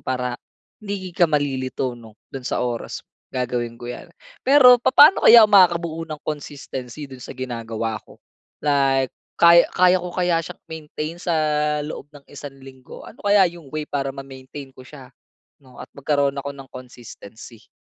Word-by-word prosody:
para 125 Hz, -1 st, -3 dB, 0.5 s
hindi 200 Hz, -3 st, -6 dB
ka 175 Hz, -1 st, +2 dB
malilito, 135 Hz, -3 st, -2 dB
'no, 115 Hz, -2 st, -14 dB, 0.2 s
'don 135 Hz, -, -6 dB
sa 125 Hz, -, -2 dB
oras. 120 Hz, -1 st, -5 dB, 0.3 s
Gagawin 120 Hz, -2 st, -3 dB
ko 120 Hz, -, -8 dB
yan. 125 Hz, -, -9 dB, 0.3 s
Pero 255 Hz, -2 st, +7 dB
papaano 290 Hz, +8 st, +5 dB
kaya 235 Hz, 0 st, +10 dB
ako 215 Hz, -, +6 dB
makakabuo 170 Hz, -4 st, +3 dB
ng 155 Hz, -2 st, -8 dB
consistency 145 Hz, -2 st, -7 dB
dun 130 Hz, -, -11 dB
sa 125 Hz, -, -10 dB
ginagawa 115 Hz, -3 st, -5 dB
ko? -, -, -19 dB, 0.4 s
Like, 135 Hz, -3 st, +1 dB, 0.3 s
kaya 170 Hz, 0 st, +7 dB
kaya 185 Hz, 0 st, +4 dB
ko 180 Hz, -1 st, -5 dB
kaya 175 Hz, -2 st, 0 dB
siyang, -, -, -10 dB
i-maintain 155 Hz, 0 st, -7 dB
sa, 175 Hz, 0 st, -3 dB, 0.5 s
loob 145 Hz, -1 st, -8 dB
ng 145 Hz, -1 st, -17 dB
isang 145 Hz, -1 st, -10 dB
linggo? 130 Hz, -1 st, -13 dB
Ano 215 Hz, -, -16 dB
kaya 200 Hz, -3 st, +4 dB
yung 165 Hz, -5 st, -14 dB
way 155 Hz, -1 st, -5 dB
para 135 Hz, -1 st, -3 dB
ma-maintain 135 Hz, 0 st, -10 dB
ko 130 Hz, -, -13 dB
siya, 135 Hz, -2 st, -13 dB, 0.6 s
'no, 130 Hz, -, -16 dB
at -, -, -10 dB
magkaroon 140 Hz, 0 st, 0 dB
ako 140 Hz, -, -4 dB
ng 135 Hz, -2 st, -13 dB
consistency? 120 Hz, -3 st, -13 dB
140 Hz, 160 wpm, -21 LUFS, 130-170 Hz, 0.6 s, kaya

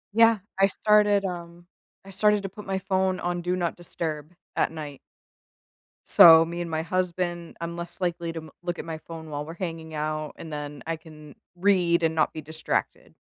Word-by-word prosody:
Yeah, 230 Hz, -1 st, +6 dB, 0.2 s
I 195 Hz, -, +6 dB
started, 205 Hz, 0 st, +3 dB
um, 175 Hz, -1 st, -6 dB, 0.4 s
I 195 Hz, -, -11 dB
started 210 Hz, +1 st, +3 dB
to 195 Hz, -, -3 dB
put 210 Hz, +1 st, -11 dB
my 195 Hz, -, 0 dB
phone 190 Hz, -1 st, 0 dB
on 175 Hz, 0 st, -2 dB
"do 180 Hz, +1 st, -1 dB
not 175 Hz, -2 st, -1 dB
disturb" 160 Hz, -2 st, -5 dB, 0.2 s
at -, -, +1 dB
night. 150 Hz, -4 st, -8 dB, 1.0 s
So, 165 Hz, -1 st, +9 dB
me 170 Hz, +1 st, -5 dB
and 170 Hz, -1 st, -3 dB
my 160 Hz, 0 st, -1 dB
husband 175 Hz, -1 st, -2 dB
I'm 170 Hz, 0 st, -4 dB
less 170 Hz, +2 st, -6 dB
likely 170 Hz, -2 st, -2 dB
to 165 Hz, -, -4 dB
m 155 Hz, -, -13 dB
look 175 Hz, 0 st, -3 dB
at -, -, -5 dB
my 160 Hz, -1 st, -5 dB
phone 160 Hz, -1 st, -9 dB
while 145 Hz, 0 st, -4 dB
we're 165 Hz, -, -7 dB
hanging 165 Hz, -2 st, -6 dB
out, 155 Hz, 0 st, -3 dB
and 160 Hz, -, -9 dB
then 145 Hz, -2 st, -6 dB
I 165 Hz, 0 st, -2 dB
can 155 Hz, -2 st, -14 dB, 0.2 s
read 175 Hz, -3 st, +3 dB
and 160 Hz, 0 st, +2 dB
not 160 Hz, -1 st, +1 dB
be 155 Hz, -, -6 dB
distracted. 155 Hz, +2 st, -2 dB
170 Hz, 195 wpm, -26 LUFS, 160-185 Hz, 1.0 s, So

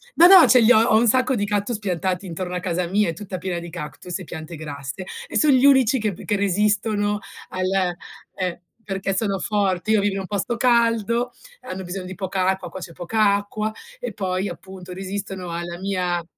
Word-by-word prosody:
no, 345 Hz, -, +8 dB
no. 375 Hz, -1 st, +9 dB
Ce 255 Hz, -, +7 dB
li 225 Hz, +2 st, +6 dB
ho 220 Hz, -, +7 dB
ho 225 Hz, -1 st, +4 dB
un 235 Hz, +2 st, +3 dB
sacco 255 Hz, +3 st, +3 dB
di 205 Hz, -3 st, 0 dB
cactus 205 Hz, +3 st, 0 dB
piantati 185 Hz, -1 st, -2 dB
intorno 180 Hz, +1 st, -5 dB
a -, -, -1 dB
casa 175 Hz, 0 st, -1 dB
mia, 205 Hz, +2 st, +1 dB
è -, -, -2 dB
tutta 185 Hz, +2 st, -6 dB
piena 175 Hz, -1 st, -3 dB
di 170 Hz, 0 st, -8 dB
cactus 170 Hz, +2 st, -5 dB
e -, -, -7 dB
piante 160 Hz, 0 st, -8 dB
grasse 145 Hz, +2 st, -6 dB, 0.2 s
e -, -, -2 dB
son 305 Hz, -, +5 dB
gli 260 Hz, 0 st, +4 dB
unici 265 Hz, -2 st, +5 dB
che 215 Hz, -2 st, -1 dB
p -, -, -11 dB
che 210 Hz, -, 0 dB
resistono 205 Hz, +1 st, +1 dB, 0.3 s
al 185 Hz, -1 st, 0 dB, 0.4 s
eh, 180 Hz, -2 st, -3 dB, 0.2 s
perché 195 Hz, -1 st, -2 dB
sono 195 Hz, -1 st, +2 dB
forti. 200 Hz, -1 st, 0 dB
Io 215 Hz, -2 st, +4 dB
vivo 205 Hz, 0 st, 0 dB
in -, -, -2 dB
un -, -, -6 dB
posto 205 Hz, +4 st, -1 dB
caldo, 235 Hz, 0 st, +2 dB, 0.3 s
hanno 185 Hz, +1 st, -6 dB
bisogno 180 Hz, +1 st, -5 dB
di 185 Hz, +1 st, -7 dB
poca 190 Hz, 0 st, -1 dB
acqua, 190 Hz, 0 st, -1 dB
qua -, -, -8 dB
c'è 175 Hz, -, -8 dB
poca 200 Hz, +4 st, +2 dB
acqua 210 Hz, +1 st, -3 dB, 0.3 s
e -, -, -5 dB
poi 190 Hz, -1 st, -2 dB
appunto 185 Hz, +1 st, -10 dB
resistono 190 Hz, -1 st, -5 dB
alla 170 Hz, +1 st, -5 dB
mia 180 Hz, -3 st, -1 dB
195 Hz, 210 wpm, -22 LUFS, 180-215 Hz, 0.4 s, no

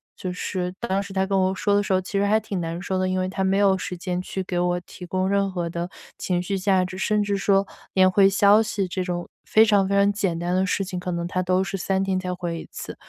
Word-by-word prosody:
就 185 Hz, -, -5 dB
是 180 Hz, 0 st, -3 dB
当 200 Hz, -4 st, -1 dB
时 200 Hz, -, -8 dB
他 190 Hz, 0 st, +1 dB
跟 195 Hz, 0 st, 0 dB
我 190 Hz, +1 st, +1 dB
说 205 Hz, 0 st, 0 dB
的 205 Hz, -, +4 dB
时 205 Hz, -, -4 dB
候 185 Hz, -, +4 dB
其 185 Hz, -, -8 dB
实 200 Hz, -, +2 dB
还 215 Hz, +2 st, +3 dB
挺 200 Hz, -4 st, -4 dB
难 165 Hz, 0 st, -4 dB
受 185 Hz, 0 st, -2 dB
的， 185 Hz, 0 st, 0 dB
因 185 Hz, -, 0 dB
为 185 Hz, -, 0 dB
他 190 Hz, 0 st, -2 dB
没 190 Hz, +1 st, +2 dB
有 200 Hz, -1 st, +4 dB
时 180 Hz, -1 st, -5 dB
间 180 Hz, 0 st, -3 dB
去 190 Hz, +1 st, -4 dB
给 175 Hz, -1 st, -2 dB
我 180 Hz, 0 st, +1 dB
提 180 Hz, -, -13 dB
供 185 Hz, +1 st, 0 dB
任 200 Hz, 0 st, +1 dB
何 175 Hz, -2 st, -2 dB
的 170 Hz, +1 st, -4 dB, 0.3 s
情 180 Hz, -1 st, 0 dB
绪 195 Hz, +1 st, -2 dB
价 185 Hz, -1 st, +2 dB
值， 185 Hz, -, -7 dB
甚 210 Hz, +1 st, +1 dB
至 200 Hz, 0 st, -1 dB
说 195 Hz, 0 st, +2 dB, 0.3 s
连 185 Hz, -1 st, +5 dB
回 195 Hz, +1 st, +5 dB
消 200 Hz, +2 st, +5 dB
息 210 Hz, -3 st, -1 dB
这 185 Hz, +1 st, -3 dB
种 175 Hz, -1 st, -3 dB, 0.2 s
非 220 Hz, +1 st, +5 dB
常 205 Hz, -3 st, +3 dB
非 200 Hz, -, +1 dB
常 200 Hz, +1 st, +4 dB
简 195 Hz, -4 st, -1 dB
单 175 Hz, +1 st, -2 dB
的 190 Hz, -, +2 dB
事 200 Hz, -, 0 dB
情， 180 Hz, -1 st, -4 dB
可 180 Hz, -, -5 dB
能 170 Hz, 0 st, -2 dB
他 185 Hz, +1 st, -1 dB
都 185 Hz, +1 st, +1 dB
是 195 Hz, -, -4 dB
3 190 Hz, +1 st, 0 dB
天 190 Hz, -1 st, 0 dB
才 185 Hz, -1 st, -4 dB
回 170 Hz, -2 st, -4 dB
1 -, -, -13 dB
次。 -, -, -7 dB
190 Hz, 295 characters per minute, -24 LUFS, 180-200 Hz, 0.3 s, 连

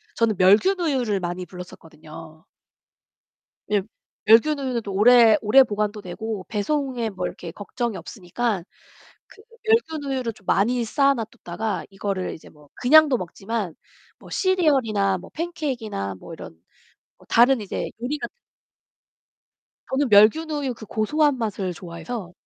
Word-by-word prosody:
저는 230 Hz, -3 st, +1 dB
멸균 205 Hz, -, +5 dB
우유를 255 Hz, -, 0 dB
많이 175 Hz, +1 st, -4 dB
불렀었거든요. 160 Hz, -3 st, -12 dB, 1.3 s
예. 205 Hz, -2 st, +2 dB, 0.4 s
멸균우유는 255 Hz, +1 st, +3 dB
또 200 Hz, -2 st, -6 dB
오래 225 Hz, +2 st, +6 dB
오래 235 Hz, +5 st, +6 dB
보관도 210 Hz, -2 st, -2 dB
되고 205 Hz, +2 st, -5 dB
배송에 245 Hz, +2 st, -1 dB
뭐 190 Hz, -, -4 dB
이렇게 170 Hz, -, -7 dB
걱정이 215 Hz, +4 st, -4 dB
없으니까 190 Hz, +3 st, -3 dB, 0.7 s
그 415 Hz, -, -17 dB, 0.2 s
멸균 320 Hz, -10 st, +1 dB
우유를 255 Hz, -3 st, -2 dB
좀 200 Hz, -, -22 dB
많이 235 Hz, +4 st, +2 dB
쌓아 275 Hz, +5 st, +2 dB
놔뒀다가 220 Hz, -3 st, -4 dB
이거를 195 Hz, -1 st, -3 dB
이제 -, -, -14 dB
뭐 150 Hz, -1 st, -20 dB
그냥도 285 Hz, +1 st, +5 dB
먹지만 195 Hz, 0 st, -4 dB, 0.4 s
뭐 -, -, -15 dB
시리얼이나 260 Hz, -, +1 dB
뭐 185 Hz, -, -13 dB
팬케익이나 260 Hz, -, -4 dB
뭐 -, -, -10 dB
이런 -, -, -10 dB, 0.6 s
뭐 -, -, -21 dB
다른 245 Hz, +2 st, +5 dB
이제 200 Hz, -, -4 dB
요리 290 Hz, +5 st, -2 dB
같은 -, -, -6 dB, 1.6 s
저는 270 Hz, +1 st, +1 dB
멸균 215 Hz, +11 st, +5 dB
우유 285 Hz, -4 st, -2 dB
그 220 Hz, -, -11 dB
고소한 280 Hz, +7 st, +1 dB
맛을 205 Hz, -5 st, -2 dB
좋아해서 175 Hz, +3 st, -7 dB
220 Hz, 300 characters per minute, -23 LUFS, 190-265 Hz, 1.6 s, 오래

